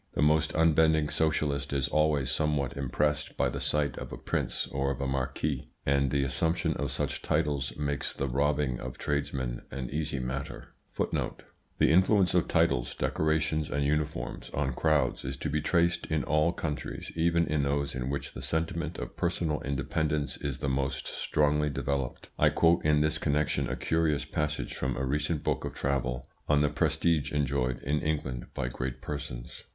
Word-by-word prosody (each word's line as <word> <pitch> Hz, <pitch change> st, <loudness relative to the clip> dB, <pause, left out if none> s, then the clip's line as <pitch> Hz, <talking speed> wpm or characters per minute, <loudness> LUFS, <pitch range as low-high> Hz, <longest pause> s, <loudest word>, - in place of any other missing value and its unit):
The -, -, +2 dB
most 75 Hz, 0 st, +3 dB
unbending 80 Hz, -1 st, +4 dB
socialist 75 Hz, -3 st, +1 dB
is 70 Hz, -1 st, +1 dB
always 75 Hz, -3 st, +2 dB
somewhat 70 Hz, -2 st, 0 dB
impressed 75 Hz, +3 st, -1 dB
by -, -, +2 dB
the -, -, -4 dB
sight 75 Hz, -3 st, 0 dB
of -, -, -7 dB
a -, -, -5 dB
prince -, -, -1 dB
or 70 Hz, 0 st, 0 dB
a 70 Hz, +1 st, -3 dB
marquis; 65 Hz, +1 st, -2 dB, 0.2 s
and 70 Hz, 0 st, +3 dB
the 70 Hz, +1 st, +1 dB
assumption 75 Hz, +6 st, +1 dB
of -, -, -2 dB
such -, -, -2 dB
titles 70 Hz, -3 st, 0 dB
makes 70 Hz, -2 st, -1 dB
the 70 Hz, -, -2 dB
robbing 70 Hz, -1 st, +1 dB
of 65 Hz, -, -6 dB
tradesmen 70 Hz, -4 st, -2 dB
an 65 Hz, -2 st, -5 dB
easy 75 Hz, -1 st, -2 dB
matter. 65 Hz, +2 st, -4 dB, 0.3 s
The -, -, -1 dB
influence 95 Hz, +1 st, +4 dB
of 90 Hz, -2 st, +3 dB
titles, -, -, +2 dB
decorations, 80 Hz, -1 st, 0 dB
and 70 Hz, 0 st, 0 dB
uniforms 75 Hz, -4 st, -2 dB
on 70 Hz, -2 st, 0 dB
crowds 70 Hz, -2 st, +1 dB
is 65 Hz, +1 st, -4 dB
to 75 Hz, -, -3 dB
be 75 Hz, 0 st, +1 dB
traced 85 Hz, +2 st, +2 dB
in 80 Hz, -1 st, 0 dB
all 75 Hz, +3 st, +3 dB
countries, 75 Hz, -4 st, -4 dB
even 85 Hz, +1 st, +3 dB
in 75 Hz, -1 st, +1 dB
those 70 Hz, 0 st, 0 dB
in 65 Hz, 0 st, -3 dB
which 70 Hz, 0 st, -3 dB
the -, -, -7 dB
sentiment 80 Hz, 0 st, -2 dB
of -, -, -6 dB
personal 85 Hz, -3 st, 0 dB
independence 75 Hz, +2 st, -1 dB
is 70 Hz, -2 st, -4 dB
the -, -, -3 dB
most 65 Hz, 0 st, -1 dB
strongly 75 Hz, 0 st, +1 dB
developed. 70 Hz, -2 st, -3 dB
I -, -, +6 dB
quote 85 Hz, +1 st, +3 dB
in 75 Hz, -1 st, +4 dB
this 75 Hz, +1 st, +2 dB
connection 75 Hz, 0 st, +1 dB
a -, -, -1 dB
curious 80 Hz, -3 st, +1 dB
passage 75 Hz, 0 st, -2 dB
from 65 Hz, -1 st, -2 dB
a 65 Hz, -, -1 dB
recent 75 Hz, +3 st, -1 dB
book -, -, 0 dB
of -, -, -5 dB
travel, 65 Hz, -2 st, -1 dB, 0.2 s
on 75 Hz, -1 st, +5 dB
the 75 Hz, -, +3 dB
prestige 80 Hz, -1 st, +1 dB
enjoyed 65 Hz, -3 st, 0 dB
in 75 Hz, +3 st, +1 dB
England 75 Hz, -6 st, -2 dB
by -, -, -1 dB
great 65 Hz, +1 st, -4 dB
persons. 70 Hz, -5 st, -6 dB
75 Hz, 170 wpm, -29 LUFS, 65-75 Hz, 0.3 s, I